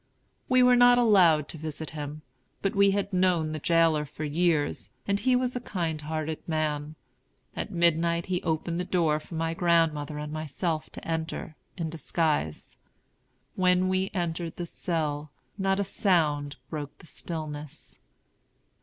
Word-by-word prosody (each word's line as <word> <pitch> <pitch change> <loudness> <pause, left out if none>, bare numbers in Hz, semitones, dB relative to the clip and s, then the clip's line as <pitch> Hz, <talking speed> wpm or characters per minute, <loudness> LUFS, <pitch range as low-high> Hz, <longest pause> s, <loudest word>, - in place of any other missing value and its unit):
We 255 0 +5
were 250 0 +6
not 245 0 +7
allowed 180 -10 +5
to 160 - -7
visit 155 0 -5
him. 150 0 -6 0.4
But 195 - +1
we 200 0 +5
had 200 0 -1
known 180 -4 +2
the 155 - -4
jailer 165 -1 +3
for 150 +1 -8
years, 155 -1 +1 0.2
and 200 0 +1
he 255 +2 +3
was 250 0 0
a - - -1
kind 170 -9 -3
hearted 155 +1 -3
man. 155 -2 -1 0.6
At - - -3
midnight 170 -2 +2
he 180 -1 -1
opened 165 +1 -1
the - - 0
door 165 -4 +1
for 165 - -10
my 165 0 -1
grandmother 165 -4 +1
and 150 0 -5
myself 155 +1 -2
to - - -9
enter, 160 -1 -3 0.2
in 165 -3 -3
disguise. 155 - -1 0.8
When 185 0 +3
we 185 +1 +1
entered 170 -2 -3
the 175 - -4
cell, 155 -3 -2 0.3
not 195 0 +1
a - - +2
sound 155 -7 +1 0.2
broke 150 -3 -5
the - - -16
stillness. 155 -4 -7
165 Hz, 155 wpm, -28 LUFS, 155-180 Hz, 0.8 s, not